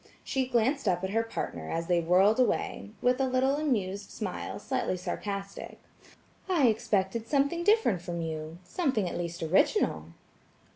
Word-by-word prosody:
She 265 -1 -1
glanced 250 +2 +1
up 180 -1 +1
at 190 - -2
her 225 +2 +2
partner, 225 0 -5
as 165 0 -2
they 175 0 +2
whirled 190 +7 +4
away, 245 -4 0
with 250 +2 +3
a 265 - +2
little 260 +2 +2
amused 205 -10 -1
smile - - -5
slightly 185 - -2
sarcastic; 200 +2 -5 0.7
"I 305 -10 +4
expected 215 0 0
something 285 +6 +1
different 415 - +3
from 175 -1 -4
you. 160 0 -4
Something 260 - 0
at - - -4
least 170 -1 -4
original." 155 - +2
205 Hz, 150 wpm, -29 LUFS, 175-260 Hz, 0.7 s, whirled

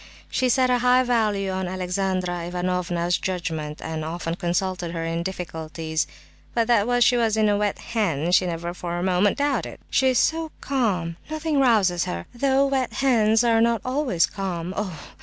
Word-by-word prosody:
She 255 - +1
set 255 +1 +3
a 250 - +3
high 250 +1 +4
value 215 -5 +1
on 190 -1 -2
Alexandra 185 -1 -2
Ivanovna's 175 -1 -1
judgment, 160 -5 -4
and 160 -1 -4
often 165 +1 -3
consulted 180 -1 -2
her 165 -1 -3
in 165 0 -2
difficulties; 160 -3 -3 0.5
but 230 -1 +3
that 240 +1 +3
she 245 - +4
was 225 -2 +1
a 220 - +3
'wet 205 0 0 0.2
hen' 175 -8 0
she 180 0 +4
never 170 0 -3
for 175 -1 -4
a 175 - -2
moment 190 +2 +2
doubted. 285 0 -1
"She 265 -1 +3
is 255 -1 +3
so 320 +4 +1
calm; 190 -11 -1
nothing 310 -1 -1
rouses 205 -9 +3
her—though 265 - 0
wet 270 -3 0
hens 225 -4 +3
are 230 -1 +3
not 230 -1 +3
always 255 - +1
calm! 185 -3 -4
Oh! 190 -7 -4
190 Hz, 165 wpm, -24 LUFS, 175-240 Hz, 0.5 s, high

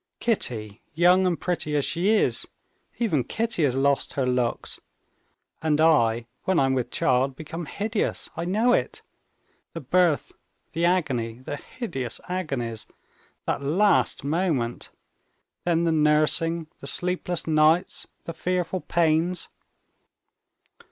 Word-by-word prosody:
Kitty, 115 - -2
young 180 +3 +5
and 175 -2 0
pretty 170 -4 -2
as 145 - +2
she 175 +4 0
is, 220 - +2 0.5
even 165 - +1
Kitty 225 - -1
has 130 -3 +1
lost 140 +1 +1
her 135 - 0
looks; 125 -2 -1 0.8
and 155 -1 +1
I 120 -8 +3 0.2
when 190 -2 +2
I'm 135 -1 +2
with 130 -2 -1
child 135 -4 +1
become 160 +2 -7
hideous, 210 +4 -2
I 170 +1 -3
know 220 +7 +2
it. - - -1 0.7
The 165 - -5
birth, 165 +2 +2 0.4
the 170 +1 0
agony, 135 -11 +1
the 130 +3 -6
hideous 135 - -6
agonies, 135 -12 -3 0.6
that - - -1
last 185 +9 +2
moment... 145 -6 -1 0.8
then 170 -1 +2
the 165 - +2
nursing, 155 +2 +2
the 140 - -8
sleepless 180 +2 0
nights, 160 +3 +2 0.2
the 165 - -5
fearful 180 +1 -1
pains...." 170 +1 +1
160 Hz, 125 wpm, -25 LUFS, 135-180 Hz, 0.8 s, young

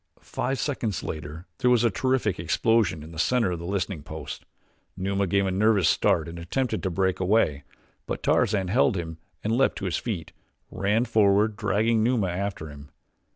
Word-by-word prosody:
Five 135 +2 -3
seconds 115 - -2
later 80 +2 -6
there 125 -2 +3
was 120 -2 +4
a 120 - +3
terrific 120 -4 0
explosion 90 -1 +1
in 80 - -11
the 80 - -8
center 115 0 +2
of 85 - -3
the 85 - -6
listening 95 -3 -2
post. - - -8 0.5
Numa 100 +1 0
gave 100 +2 +2
a 95 - 0
nervous 100 -2 +3
start 80 0 +2
and 85 +1 -7
attempted 110 +6 -2
to 95 - -1
break 95 +1 0
away; 90 -7 +2 0.4
but - - -4
Tarzan 95 -3 +2
held 110 -1 +3
him 80 -1 -5 0.2
and, 110 +2 +1
leaping 135 +2 +2
to 100 - -5
his 85 -4 -1
feet, 100 -9 -4 0.4
ran 105 +5 +1
forward, 105 -1 +3
dragging 110 +2 +1
Numa 110 -4 +1
after 90 -3 -4
him. 70 0 -12
100 Hz, 180 wpm, -26 LUFS, 85-110 Hz, 0.5 s, was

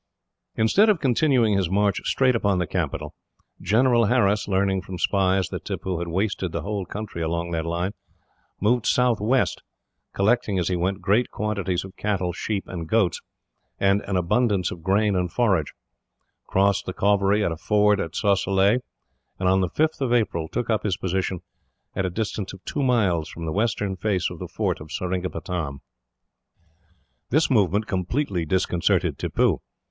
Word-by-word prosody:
Instead 190 - +4
of 205 -5 +3
continuing 125 -4 +3
his 95 -3 +1
march 100 0 +1
straight 130 -2 +2
upon 100 -4 +1
the 90 - 0
capital, - - -3 0.5
General 120 +4 +3
Harris, 105 -3 +2
learning 95 -1 +1
from 95 -1 -7
spies 95 +1 +1
that - - -6
Tippoo 90 -3 -3
had 85 - -4
wasted 95 0 -1
the - - -4
whole 100 -3 -3
country 105 -4 -6
along 85 +1 -2
that 80 -1 -2
line, 85 +3 -1 0.7
moved 115 +3 +2
southwest; 120 -4 +2 0.5
collecting, 105 0 +1
as 90 -1 0
he 90 - 0
went, 95 +3 -1
great 105 +6 +2
quantities 100 -4 -2
of 95 0 -12
cattle, 95 -4 -1
sheep, 100 +2 -3
and 85 -3 -6
goats, 110 -6 +2 0.6
and 100 +1 +3
an 95 - -1
abundance 95 +2 +1
of 85 - -8
grain 100 +3 +2
and 90 -2 -1
forage; 95 - +1 0.8
crossed 100 +1 +2
the 95 - -3
Cauvery 100 +1 +2
at - - 0
a - - -2
ford 105 +4 +2
at 80 -3 -4
Sosilay; 100 +2 +2 0.6
and, 95 - -1
on 95 +1 +4
the 90 - 0
5th 155 - 0
of 130 -3 0
April, 95 -9 +1
took 115 - -3
up 110 -1 +1
his 95 -4 -1
position 95 -1 -2 0.5
at 95 - 0
a - - -2
distance 105 0 -3
of 95 - -13
two 145 - -2
miles 100 - +1
from 85 - -7
the 80 - -2
western 105 -2 0
face 95 -2 -1
of - - -9
the - - -5
fort - - -2
of 75 - -10
Seringapatam. 90 -5 -3 1.5
This 155 +2 +2
movement 105 -2 +2
completely 95 - -1
disconcerted 90 -2 +1
Tippoo. - - +1
95 Hz, 165 wpm, -24 LUFS, 90-110 Hz, 1.5 s, Instead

